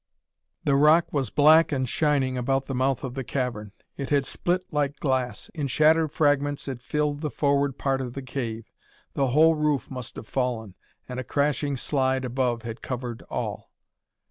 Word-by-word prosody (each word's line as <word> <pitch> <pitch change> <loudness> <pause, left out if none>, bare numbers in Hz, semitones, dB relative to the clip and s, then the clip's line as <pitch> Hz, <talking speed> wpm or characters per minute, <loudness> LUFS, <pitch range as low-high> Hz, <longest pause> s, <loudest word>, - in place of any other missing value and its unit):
The 140 - +2
rock 155 +4 +4
was 135 -6 0
black 155 +3 +5
and 130 -3 0
shining 135 0 +1
about 135 +2 0
the 135 - -4
mouth 130 0 0
of 130 -2 -4
the 135 0 -4
cavern. 120 -5 -3 0.3
It 140 - -4
had 140 -2 +2
split 180 +6 -1
like 145 -1 0
glass. 130 -3 -1
In 150 -4 -3
shattered 155 +3 +3
fragments 145 -2 +1
it 130 -3 -5
filled 150 +2 -1
the 150 - -1
forward 140 -2 +1
part 135 -1 0
of 125 -2 -5
the 135 - -6
cave. 115 -4 -5 0.4
The 135 - +1
whole 155 +6 +5
roof 150 -3 0
must 125 -2 -7
have 110 - -9
fallen, 120 -6 -2 0.3
and 125 0 -5
a - - -3
crashing 140 +1 0
slide 130 -1 0
above 125 -2 -1
had 115 0 -6
covered 125 -2 -5
all. - - -4
135 Hz, 175 wpm, -26 LUFS, 125-145 Hz, 0.4 s, black